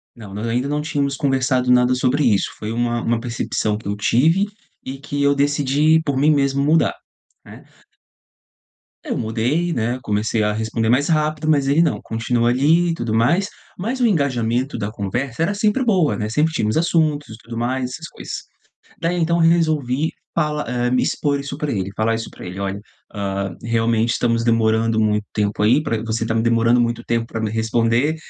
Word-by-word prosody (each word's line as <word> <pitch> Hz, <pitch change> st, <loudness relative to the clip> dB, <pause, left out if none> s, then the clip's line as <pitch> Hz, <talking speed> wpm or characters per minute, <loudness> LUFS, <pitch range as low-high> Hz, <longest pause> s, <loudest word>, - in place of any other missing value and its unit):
Não, 105 Hz, -4 st, -11 dB
nós 105 Hz, +3 st, -4 dB
ainda 125 Hz, +4 st, 0 dB
não 150 Hz, +1 st, -1 dB
tínhamos 140 Hz, -2 st, -1 dB
conversado 130 Hz, -2 st, +1 dB
nada 125 Hz, 0 st, +4 dB
sobre 130 Hz, +3 st, +1 dB
isso, 105 Hz, -6 st, +2 dB
foi 105 Hz, +1 st, -5 dB
uma 120 Hz, 0 st, -1 dB
uma 115 Hz, 0 st, 0 dB
percepção 115 Hz, -3 st, -2 dB
que 110 Hz, -, -10 dB
eu 100 Hz, -, -1 dB
tive 160 Hz, -, +2 dB, 0.4 s
e 135 Hz, +1 st, -5 dB
que 145 Hz, 0 st, -4 dB
eu 140 Hz, 0 st, +3 dB
decidi 145 Hz, +2 st, +2 dB
por 140 Hz, -4 st, -1 dB
mim 150 Hz, +3 st, +4 dB
mesmo 140 Hz, -1 st, +1 dB
mudar, 160 Hz, +3 st, +2 dB, 0.5 s
né. -, -, -13 dB, 1.4 s
Eu -, -, -3 dB
mudei, 125 Hz, +10 st, -1 dB
né, 120 Hz, +2 st, -1 dB
comecei 105 Hz, +1 st, 0 dB
a 105 Hz, -, +1 dB
responder 110 Hz, +1 st, -1 dB
mais 130 Hz, +5 st, +3 dB
rápido, 155 Hz, -1 st, 0 dB
mas 140 Hz, -3 st, +3 dB
ele 145 Hz, +4 st, +4 dB
não 170 Hz, -, +1 dB
continua 120 Hz, +1 st, 0 dB
ali 155 Hz, +8 st, +3 dB
e -, -, +1 dB
tudo 120 Hz, -8 st, -3 dB
mais, 170 Hz, -, +2 dB, 0.3 s
mas 230 Hz, +8 st, -3 dB
o -, -, +4 dB
engajamento 130 Hz, -, 0 dB
da 100 Hz, +1 st, -3 dB
conversa 120 Hz, +8 st, -3 dB
era 190 Hz, +5 st, 0 dB
sempre 215 Hz, +5 st, +1 dB
boa, 185 Hz, -9 st, +2 dB
né, 105 Hz, -, -2 dB
sempre 150 Hz, +7 st, +1 dB
tínhamos 110 Hz, -8 st, -1 dB
assuntos 155 Hz, -4 st, +1 dB
e 110 Hz, -, -9 dB
tudo 115 Hz, 0 st, -9 dB
mais, 125 Hz, +1 st, -2 dB
essas -, -, -7 dB
coisas, -, -, -9 dB, 0.7 s
daí 170 Hz, +1 st, 0 dB
então 170 Hz, 0 st, +1 dB
resolvi 160 Hz, -4 st, +2 dB, 0.2 s
fala 150 Hz, -2 st, 0 dB
eh, 125 Hz, +1 st, -1 dB
me 125 Hz, 0 st, +2 dB
expor 140 Hz, -1 st, 0 dB
isso 140 Hz, 0 st, -6 dB
pra 150 Hz, -1 st, -3 dB
ele, 95 Hz, -2 st, -2 dB
falar 115 Hz, +1 st, +1 dB
isso 115 Hz, -, -5 dB
pra -, -, -11 dB
ele: 90 Hz, +2 st, -7 dB
"Olha, 100 Hz, 0 st, -3 dB, 0.3 s
ah, 100 Hz, -1 st, -3 dB
realmente, 115 Hz, 0 st, +1 dB
estamos 115 Hz, -1 st, 0 dB
demorando 115 Hz, -1 st, +2 dB
muito 105 Hz, -1 st, +1 dB
tempo, 105 Hz, -1 st, -1 dB
aí 125 Hz, +8 st, +4 dB
pra 115 Hz, -7 st, -2 dB
você 115 Hz, 0 st, -2 dB
tá 115 Hz, -, -1 dB
demorando 115 Hz, +1 st, +3 dB
muito 120 Hz, 0 st, 0 dB
tempo 115 Hz, -1 st, -1 dB
pra 115 Hz, -, -5 dB
me 105 Hz, -1 st, -2 dB
responder, 115 Hz, +6 st, +1 dB
125 Hz, 190 wpm, -20 LUFS, 115-150 Hz, 1.4 s, nada